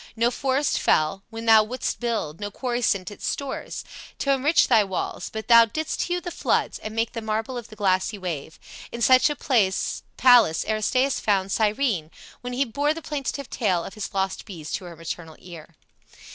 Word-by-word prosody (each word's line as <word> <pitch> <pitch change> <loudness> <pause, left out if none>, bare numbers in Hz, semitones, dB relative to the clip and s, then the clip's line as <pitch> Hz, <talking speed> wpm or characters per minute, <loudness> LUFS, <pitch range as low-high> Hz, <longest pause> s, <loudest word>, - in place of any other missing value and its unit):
No 235 +1 +2
forest 270 +3 0
fell 155 +5 +2
When 225 0 -7
thou 220 -1 +7
wouldst 250 +4 -3
build, 220 -10 -2
no 205 0 -4
quarry 245 +2 -3
sent 200 -3 0
its 205 - -6
stores 280 -1 -4 0.3
T' 275 - 0
enrich 280 +4 +3
thy 225 -4 +5
walls; 190 -2 -4
but 220 0 -6
thou 230 -1 +8
didst 310 +7 -3
hew 355 0 -1
the 350 0 -6
floods - - 0
And 215 0 -7
make 225 0 0
thy 230 - -5
marble 220 +3 -2
of 240 -3 -6
the 215 - -13
glassy 195 0 +1
wave. 160 -5 -5 0.3
In 235 0 -4
such 255 +4 +6
a 295 - -2
palace 235 - +3
Aristaeus 255 +5 +1
found 195 -2 0
Cyrene, 215 - 0 0.3
when 245 0 -5
he 270 +3 +1
bore 285 +6 0
the 330 - -8
plaintive 280 -2 -4
tale 185 -7 0
Of - - -8
his 215 -3 -6
lost 190 -1 -2
bees 165 -8 -8
to 190 - -3
her 175 -1 -9
maternal 165 0 -7
ear." 170 -2 -12
220 Hz, 185 wpm, -24 LUFS, 190-255 Hz, 0.3 s, thou